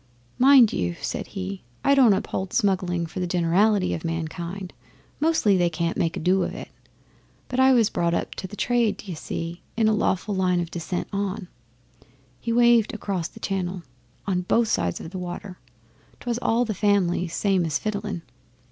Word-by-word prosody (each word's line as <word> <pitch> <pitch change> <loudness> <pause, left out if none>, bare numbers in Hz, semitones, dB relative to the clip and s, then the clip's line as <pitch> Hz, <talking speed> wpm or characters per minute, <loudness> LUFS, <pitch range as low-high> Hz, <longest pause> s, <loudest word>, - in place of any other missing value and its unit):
'Mind 260 -3 +7
you,' 85 -1 -1
said - - -4
he, 95 +1 -5 0.2
'I 280 - +5
don't 255 -6 +6
uphold 190 -1 -3
smuggling 180 -3 +1
for 165 +3 -7
the 180 - -1
generality 180 +4 +2
o' - - -4
mankind 170 +3 -4 0.5
mostly 300 -10 +3
they 175 -1 +3
can't 170 0 -2
make 165 -1 -1
a - - -2
do 185 +3 +2
of - - -2
it - - -8 0.8
but 255 - -3
I 260 0 +6
was 230 -4 +3
brought 170 0 +1
up - - -2
to 185 - -6
the 205 - -10
trade, 235 -2 +1
d'ye 195 -3 -7
see, 165 +2 -5 0.2
in 225 -1 +3
a 220 - +4
lawful 205 -1 0
line 185 -2 +1
o' - - +1
descent 170 +1 -4
on' 200 -1 -3 0.9
he 230 - -3
waved 235 -2 +4
across 190 -6 -2
the - - -15
Channel 185 -2 -3 0.4
'on 185 -2 0
both 225 +5 +2
sides 90 - 0
the 185 +3 -7
water. 180 +1 -7 0.6
'Twas 240 -1 -2
all 235 -1 +1
in - - +2
the - - +1
families, 185 -4 +1
same 195 -3 +2
as 155 -3 0
fiddling. 205 -4 -4
190 Hz, 180 wpm, -24 LUFS, 175-215 Hz, 0.9 s, Mind